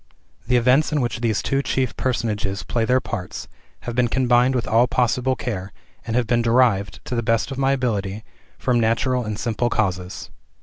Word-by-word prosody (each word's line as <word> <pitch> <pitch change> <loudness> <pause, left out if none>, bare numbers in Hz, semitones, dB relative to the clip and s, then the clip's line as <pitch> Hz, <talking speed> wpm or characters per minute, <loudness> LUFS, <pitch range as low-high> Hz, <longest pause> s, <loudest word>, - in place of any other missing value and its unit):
The 125 - +2
events 125 +6 +3
in 150 - +1
which 120 -2 -2
these 110 -3 0
two 135 0 +1
chief 130 -3 -1
personages 105 -6 -2
play 115 -2 -1
their 125 +2 +3
parts 90 -7 -6 0.3
have 120 - -5
been 125 0 +2
combined 125 +1 +3
with 120 -3 -1
all 115 +4 +4
possible 125 +1 +1
care, 100 -7 -4 0.4
and 115 - -2
have 125 -1 +2
been 120 +1 +2
derived, 115 -5 +2
to - - -5
the 120 - 0
best 115 +3 0
of 135 - -5
my 135 0 +3
ability, 110 -5 -2 0.3
from 125 -2 +1
natural 120 +3 +1
and 105 -2 -4
simple 120 +1 -1
causes. 90 -5 -2
120 Hz, 185 wpm, -22 LUFS, 110-125 Hz, 0.4 s, all